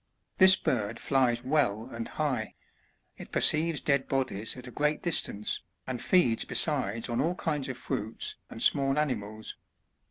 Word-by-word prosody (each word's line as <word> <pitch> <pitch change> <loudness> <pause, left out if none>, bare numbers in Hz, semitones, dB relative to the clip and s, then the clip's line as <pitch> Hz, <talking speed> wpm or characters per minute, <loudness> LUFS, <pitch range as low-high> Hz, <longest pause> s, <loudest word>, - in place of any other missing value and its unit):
This 190 0 +9
bird 110 - -2
flies 125 -3 +1
well 125 -6 +1
and 115 -1 -5
high; 135 -8 -2 0.6
it - - -11
perceives 160 -1 +3
dead 140 -2 +1
bodies 130 -5 -2
at 125 - -9
a 125 - -9
great 150 +3 0
distance, 105 - -2 0.3
and 130 -2 -4
feeds 150 -12 +3
besides 115 -8 -1
on 120 -1 -1
all 170 +3 0
kinds 150 -6 -2
of 130 - -5
fruits 110 -1 -3
and - - -2
small 135 0 +4
animals. 110 -7 -3
130 Hz, 150 wpm, -29 LUFS, 115-150 Hz, 0.6 s, This